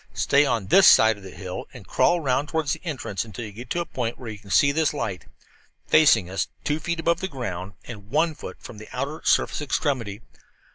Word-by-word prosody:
Stay 140 +1 +3
on 115 -7 0
this 190 - +6
side 110 0 +7
of 100 - -15
the 95 - -10
hill 95 -1 -7
and 115 -6 -11
crawl 175 - +3
around 140 0 0
toward 160 -2 -1
the - - -1
entrance 130 - -3
until 110 0 -7
you 105 - -8
get 120 +4 -10
to 175 - -1
a - - -3
point 120 -6 -4
where 120 -3 -7
you 105 - -9
can 105 -3 -16
place 140 +8 +4
this 155 -1 +1
light, 100 -9 -4 0.6
facing 130 - +5
us, 95 +2 -2 0.2
two 150 +1 -1
feet 170 +2 -3
above 170 +1 +1
the 190 - -2
ground 100 - -5
and 105 -4 -10
one 160 +4 +2
foot - - -9
in - - -30
from - - -10
the 110 - -11
outer 140 +5 -4
surface - - +2
extremity. 120 -6 -2
125 Hz, 230 wpm, -24 LUFS, 105-155 Hz, 0.6 s, side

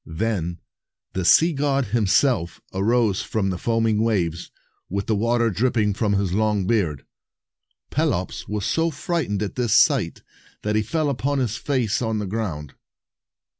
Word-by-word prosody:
Then 90 -4 -1 0.6
the 95 - -2
sea 160 - +5
god 140 -1 +1
himself 105 - +2
arose 105 +1 +2
from 95 -3 -1
the 90 - -4
foaming 115 -2 +1
waves, 90 -7 -1 0.4
with 100 +1 -2
the 110 - +1
water 115 +2 +1
dripping 110 -1 +1
from 105 0 0
his 100 -2 0
long 105 -1 +1
beard. 90 - 0 0.9
Pelops - - -1
was 105 -1 -3
so 165 0 +1
frightened 145 - -2
at 105 - -4
this 120 -4 0
sight, 115 - +3 0.4
that 105 0 0
he 110 - +3
fell 150 +8 -1
upon 140 +1 -1
his 120 -5 -1
face 125 -5 -1
on 110 -2 -1
the 105 - -2
ground. 90 -9 -4
110 Hz, 150 wpm, -23 LUFS, 100-120 Hz, 0.9 s, sea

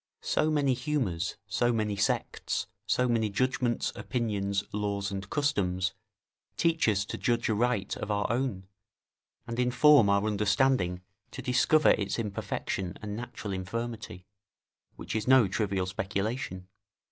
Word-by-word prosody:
So 155 - +1
many 145 -4 +2
humours, 120 - -1
so 120 +3 +1
many 110 -3 0
sects, 100 - -1 0.2
so 125 - +2
many 115 -3 +1
judgments, 125 +3 0
opinions, 100 -5 -1
laws, 100 -1 -2
and 95 0 -5
customs, 95 - 0 0.6
teach 165 -4 +2
us 100 -1 +1
to - - -6
judge 120 -1 +1
aright 110 -2 0
of 105 - -5
our 105 -1 0
own, 120 -6 -1 0.8
and 115 0 -5
inform 125 -1 +5
our 100 +1 +3
understanding 105 -2 +1 0.3
to 130 - -8
discover 135 +5 +4
its 100 -2 0
imperfection 100 -3 -3
and 105 -1 -4
natural 110 -3 -6
infirmity, 105 -1 -5 0.7
which - - -6
is 110 +1 -1
no 130 -4 +6
trivial 95 -1 -1
speculation. 95 +1 -3
110 Hz, 130 wpm, -29 LUFS, 100-125 Hz, 0.8 s, no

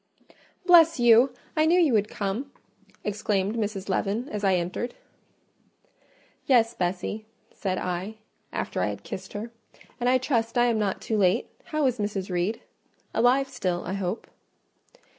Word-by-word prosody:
"Bless 330 -4 +7
you!—I 245 +6 +4
knew 350 +3 +5
you 315 -8 +4
would 210 -1 +3
come!" 215 +8 -3 0.5
exclaimed 210 0 -1
Mrs. 205 -3 -3
Leaven, 200 +5 -1
as 210 -1 -4
I 190 -1 +4
entered. 180 +7 -3 1.5
"Yes, 235 -3 +4
Bessie," 185 +3 -3 0.3
said 185 -2 -2
I, 185 +4 -3 0.4
after - - -3
I - - +1
had - - -5
kissed - - -7
her; 215 +3 -5 0.5
"and 245 0 +2
I 255 - +5
trust 235 -3 -1
I 240 - +5
am 230 -2 +2
not 200 -3 -1
too 220 - -1
late. 185 -2 +2
How 305 -2 0
is 250 -3 +1
Mrs. 200 -2 -2
Reed?—Alive 230 +7 -1
still, 185 -9 -2
I 185 - -3
hope." 195 +2 -3
215 Hz, 140 wpm, -26 LUFS, 195-245 Hz, 1.5 s, Bless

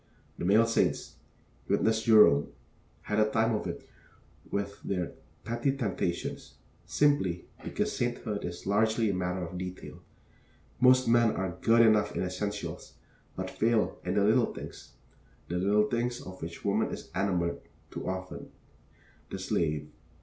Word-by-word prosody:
The - - -2
male 105 +5 +5
saints 115 - 0 0.5
witness 110 0 +2
Jerome 105 -11 +6 0.6
had 105 0 -1
a 110 0 +4
time 110 +1 +2
of 105 - -2
it - - -6 0.6
with 100 0 -3
their 90 -3 -2 0.3
petty 120 +4 -1
temptations, 95 -7 -3 0.3
simply 145 -13 +2 0.2
because - - -2
sainthood 120 -4 -2
is 85 0 -6
largely 110 +2 +2
a - - -2
matter 90 0 -2
of 90 +2 -7
detail. 90 0 -7 0.8
Most 130 +1 +5
men 115 -1 +4
are 95 -2 -2
good 115 +1 +5
enough 105 -2 +3
in - - 0
essentials, 100 +3 -4 0.4
but - - -4
fail 115 0 +1
in 90 +2 -2
the 100 - +3
little 110 +3 +3
things; - - -10 0.6
the 90 +1 -1
little 105 +3 +3
things, 120 +1 -1
of 95 0 -10
which 85 +1 -7
woman - - +1
is - - -8
enamored, 90 -3 0 0.3
too - - -4
often, 95 0 -6 0.8
the - - -5
slave. 75 -3 -1
105 Hz, 140 wpm, -29 LUFS, 90-115 Hz, 0.8 s, Jerome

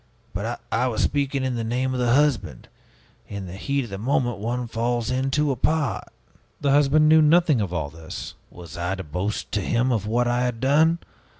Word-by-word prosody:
but - - -3
I 125 +3 +1
was 110 -4 -1
speaking 140 -2 0
in 130 -1 -1
the 115 -1 -2
name 125 +3 -1
of 125 - -2
the 120 0 +3
husband. 145 0 0 0.6
In 100 -1 -6
the 90 - -8
heat 140 +8 -1
of 115 - -9
the 95 - -5
moment 120 -1 0
one 120 +3 -2
falls 120 0 -1
into 135 +3 +1
a - - -1
part 150 0 0 0.3
" - - -35
"The 140 - +2
husband 145 +2 +4
knew 160 +1 +6
nothing 155 -4 +4
of 95 -4 -2
all 80 -5 -3
this." 80 0 -8 0.2
"Was 85 -2 -11
I 90 +3 -2
to 95 - -6
boast 90 +7 -4
to 105 - 0
him 120 +6 +1
of 110 -3 -1
what 120 +2 +1
I 120 +1 +1
had 125 -2 -1
done? 155 +6 +3
125 Hz, 210 wpm, -24 LUFS, 105-140 Hz, 0.6 s, knew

